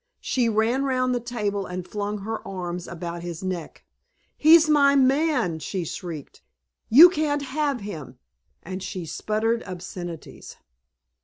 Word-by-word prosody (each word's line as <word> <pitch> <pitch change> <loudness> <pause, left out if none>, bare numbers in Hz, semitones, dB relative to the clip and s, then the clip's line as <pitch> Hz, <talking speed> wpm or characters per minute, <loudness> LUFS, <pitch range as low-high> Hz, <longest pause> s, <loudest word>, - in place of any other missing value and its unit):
She 245 -3 +1
ran 225 +5 +1
round 255 -2 +1
the 245 - 0
table 210 -5 -3
and 180 0 -6
flung 205 0 -4
her 220 +2 -4
arms 180 -2 -5
about 170 0 -6
his 175 0 -6
neck. 180 -4 -5 0.5
"He's 315 +1 +6
my 285 -2 +5
man!" 270 - +2
she 180 +2 -4
shrieked. 160 -3 -7 0.5
"You 295 +10 +10
can't 300 -4 -1
have 280 -2 -1
him." 155 -11 -8 0.5
And 185 +2 -6
she 185 -1 -5
sputtered 215 +7 -1
obscenities. 175 -3 -8
210 Hz, 135 wpm, -24 LUFS, 180-265 Hz, 0.5 s, You